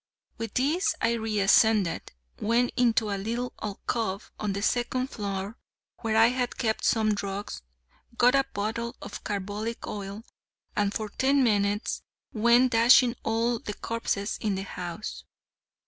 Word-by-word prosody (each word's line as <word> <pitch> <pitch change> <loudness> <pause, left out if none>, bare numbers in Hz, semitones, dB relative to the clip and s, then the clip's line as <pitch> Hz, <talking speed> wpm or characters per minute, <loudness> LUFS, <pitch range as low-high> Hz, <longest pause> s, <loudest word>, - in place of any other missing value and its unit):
With 225 -2 -5
these 305 +9 +2
I 230 - +2
re 220 -2 -1
ascended, 205 -2 +3 0.3
went 235 +3 +2
into 225 -3 +2
a 200 - -2
little 235 +4 -3
alcove 205 -1 -3
on 210 -2 -1
the 200 +1 -3
second 255 +3 0
floor 200 +1 -4 0.4
where 220 -2 0
I 225 +1 +7
had 250 -1 -2
kept 220 -3 -1
some 220 -2 +3
drugs, 200 0 -4 0.6
got 245 +1 +5
a 275 0 +4
bottle 225 +3 -3
of - - -8
carbolic 205 +3 -4
oil, 200 +1 -6 0.5
and 205 -2 +1
for 215 0 -3
ten 270 +5 +2
minutes 205 -2 +1 0.3
went 235 +3 +4
dashing 240 +1 +6
all 230 +1 0
the 210 - -6
corpses 225 -2 -2
in 210 -3 0
the 190 - -3
house. 180 +1 -6
220 Hz, 145 wpm, -27 LUFS, 205-235 Hz, 0.6 s, I